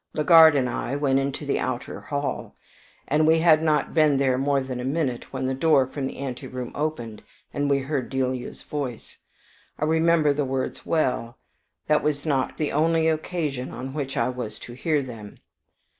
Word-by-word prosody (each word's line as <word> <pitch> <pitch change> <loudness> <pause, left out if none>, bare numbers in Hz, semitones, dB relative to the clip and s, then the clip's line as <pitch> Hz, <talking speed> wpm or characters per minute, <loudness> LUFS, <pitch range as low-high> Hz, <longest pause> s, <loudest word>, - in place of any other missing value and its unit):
Legard 160 0 +7
and 130 -3 +2
I 130 +2 -3
went 140 -2 +2
into 140 +2 -3
the 140 - 0
outer 125 -1 -4
hall, 145 -1 -4 0.5
and 155 +2 +2
we 160 +1 +5
had 160 -1 +5
not 155 -3 +1
been 155 -3 +4
there 135 -2 +2
more 140 +2 +1
than 130 -2 -5
a - - -4
minute 135 -3 -2
when 130 -1 -3
the 130 - 0
door 135 -1 +3
from 135 +1 -4
the - - -8
anteroom 125 -2 -6
opened, 120 -8 -4 0.3
and 145 0 -1
we 140 - +3
heard 135 -1 -3
Delia's 130 -2 -3
voice. 135 -6 -6 0.6
I 150 - -1
remember 160 -1 +3
the 145 +1 -1
words 130 -1 -3
well, 125 -6 0 0.5
that 150 0 +3
was 145 -1 -1
not 135 -4 0
the 150 - -1
only 160 +2 +2
occasion 155 -5 -2
on 130 +1 -7
which 140 -3 -4
I - - +1
was 125 -4 -5
to 120 - -10
hear 150 +3 0
them. 115 -5 -10
140 Hz, 180 wpm, -24 LUFS, 130-155 Hz, 0.6 s, Legard